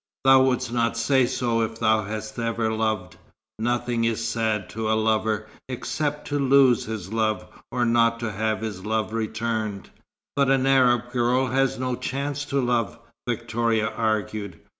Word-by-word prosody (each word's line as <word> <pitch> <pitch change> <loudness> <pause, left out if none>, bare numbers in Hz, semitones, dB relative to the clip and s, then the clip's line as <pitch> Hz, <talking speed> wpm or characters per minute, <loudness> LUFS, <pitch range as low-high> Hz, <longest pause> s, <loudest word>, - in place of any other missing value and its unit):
"Thou 135 0 +7
wouldst 125 -2 0
not 115 -1 +1
say 130 +1 +3
so, 120 -2 0
if 115 0 -2
thou 110 -1 +3
hadst 110 +2 -6
ever 115 -1 -1
loved. 110 -5 -2 0.4
Nothing 120 0 0
is 115 0 0
sad 110 -3 -1
to 110 0 -3
a 110 - +3
lover, 110 -1 0 0.2
except 150 +3 -3
to 145 0 0
lose 135 -3 +4
his 110 -3 -6
love, 110 -4 0 0.3
or 125 -1 +1
not 115 0 +3
to 115 -2 -2
have 110 +2 -1
his 105 -4 -5
love 110 -1 -1
returned." 110 -3 -3 0.4
"But 140 -1 +2
an 135 -1 +3
Arab 125 -3 +3
girl 125 +1 +2
has 135 +1 +1
no 125 0 -1
chance 140 +3 -3
to 140 -1 -1
love," 120 -5 0 0.3
Victoria 115 -1 0
argued. 105 -4 -2
115 Hz, 160 wpm, -24 LUFS, 110-125 Hz, 0.4 s, Thou